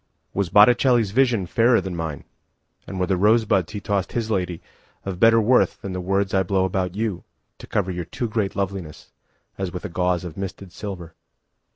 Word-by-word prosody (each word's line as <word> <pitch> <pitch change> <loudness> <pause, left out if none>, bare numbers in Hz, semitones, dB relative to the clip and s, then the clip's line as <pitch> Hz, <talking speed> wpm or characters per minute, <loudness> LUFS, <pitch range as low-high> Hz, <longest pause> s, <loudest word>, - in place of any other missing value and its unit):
Was 100 -3 -1
Botticelli's 120 +1 +5
visionFairer 115 -1 +3
than 95 -2 -5
mine; 80 -4 -4 0.6
And 95 - -5
were 90 - +2
the 95 - 0
pointed 110 +4 +3
rosebudsHe 100 +3 0
tossed 100 -2 -1
his 115 -2 -2
ladyOf 90 -4 -1 0.6
better 115 +1 +6
worthThan 110 -4 +2
the 90 - -3
words 95 +2 0
I 95 - +3
blow 95 0 +1
about 90 -1 -1
youTo 105 -3 -3 0.5
cover 95 -2 0
your 90 -1 -4
too 120 +8 -4
great 105 -3 -1
lovelinessAs 95 0 -6
with 90 - -6
a - - -4
gauzeOf 90 -1 -1
misted 95 -1 -7
silver? 90 -5 -7
95 Hz, 160 wpm, -23 LUFS, 90-110 Hz, 0.6 s, better